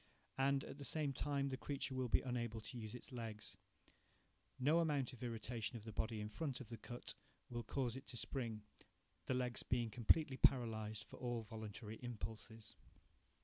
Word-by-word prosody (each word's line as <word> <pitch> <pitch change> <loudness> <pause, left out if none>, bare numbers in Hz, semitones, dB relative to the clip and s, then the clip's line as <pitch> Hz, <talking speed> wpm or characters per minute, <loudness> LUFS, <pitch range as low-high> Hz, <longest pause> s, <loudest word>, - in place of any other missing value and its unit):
And, 135 0 +4
at 140 - -7
the - - -4
same 145 -1 +2
time, 140 0 +1
the 130 - -1
creature 140 -1 -1
will 130 -1 +1
be - - +6
unable 120 -3 0
to 110 +3 -7
use 110 -1 -4
its 125 - -8
legs. 115 -4 -4 1.0
No 150 +6 +6
amount 145 -6 +2
of 120 - -11
irritation 115 -1 -2
of 110 - -9
the 110 - -5
body 110 +1 0
in 105 - -1
front 135 +4 -2
of 125 -5 -7
the 115 - -4
cut 120 +2 -4 0.4
will 120 0 -1
cause 125 -1 0
it 135 +1 -7
to 120 - -5
spring, 115 -5 -2 0.6
the 130 - +3
legs 125 -1 +1
being 120 -2 +1
completely 130 +4 +5
paralyzed 110 -5 +4
for - - -11
all 120 -2 -1
voluntary 110 0 -5
impulses. 110 -1 -5
120 Hz, 180 wpm, -42 LUFS, 110-135 Hz, 1.0 s, be